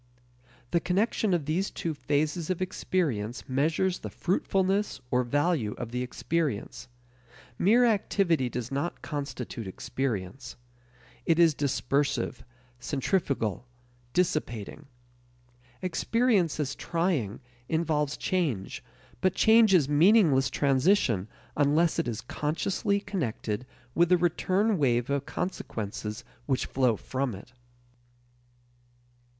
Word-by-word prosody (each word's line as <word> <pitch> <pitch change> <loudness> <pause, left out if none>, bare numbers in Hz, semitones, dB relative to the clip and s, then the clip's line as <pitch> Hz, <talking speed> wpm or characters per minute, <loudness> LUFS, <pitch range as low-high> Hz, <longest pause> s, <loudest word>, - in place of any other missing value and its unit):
The 170 - +3
connection 200 +4 +1
of 170 -5 +1
these 175 +6 0
two 165 - -3
phases 155 +3 -1
of 185 - -1
experience 145 - -2
measures 160 +8 +1
the - - -6
fruitfulness 195 +2 0
or 125 - +3
value 145 -3 +1
of 120 -1 -6
the 125 +1 -2
experience. 125 -2 -2 0.7
Mere 235 +6 +5
activity 195 - +2
does 120 +1 -5
not 140 +6 -3
constitute 140 -7 -5
experience. 120 +2 -4 0.7
It 165 - +4
is 170 -2 +6
dispersive, 140 -2 0 0.4
centrifugal, 135 - -1 0.5
dissipating. 150 - -1 1.0
Experience 190 -1 +1
as 140 -2 -1
trying 160 - -1 0.3
involves 155 -3 0
change, 150 - -1 0.4
but 185 0 +2
change 220 -1 +6
is 170 -8 +5
meaningless 150 -3 +5
transition 135 - +2 0.3
unless 150 +3 +3
it - - 0
is 115 -1 -3
consciously 180 - -1
connected 125 - -3 0.3
with 170 0 +3
the 180 - +6
return 185 +4 +1
wave 120 -2 +2
of 140 0 -1
consequences 110 - -4 0.2
which 130 -3 +1
flow 130 -4 +2
from 130 -1 -3
it. 100 +6 -13
150 Hz, 105 wpm, -28 LUFS, 125-180 Hz, 1.0 s, is